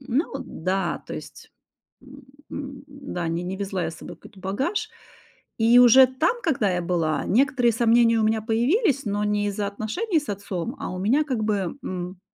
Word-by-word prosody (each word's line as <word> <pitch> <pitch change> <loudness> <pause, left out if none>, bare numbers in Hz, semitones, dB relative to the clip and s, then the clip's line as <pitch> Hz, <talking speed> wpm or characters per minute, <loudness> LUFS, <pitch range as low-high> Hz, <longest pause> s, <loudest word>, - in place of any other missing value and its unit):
Ну 270 +4 -1
да, 190 -3 -3
то - - -6
есть - - -10 0.5
М, 270 +1 -14 0.3
м, 280 -1 -7
да, 275 -11 -6
ни 165 +1 -2
не 185 +2 -4
везла 190 -3 -3
я 160 - -2
с 165 - -11
собой - - -10
какой-то 200 - -16
багаж. 260 - -2 0.7
И 230 +2 +5
уже 250 +2 +8
там, 315 - 0
когда 250 - +1
я 180 -1 -1
была, 165 -4 0
некоторые 250 +1 +3
сомнения 230 0 +4
у - - +2
меня 220 0 +1
появились, 275 - +1
но 205 0 -1
не 205 0 0
из-за 205 0 -2
отношений 220 - -1
с 290 - -12
отцом, 200 - -4
а - - -4
у 185 - -5
меня 255 +11 +2
как 255 -7 -2
бы, 205 +1 -1
м 180 0 -5
225 Hz, 185 wpm, -24 LUFS, 195-270 Hz, 0.7 s, уже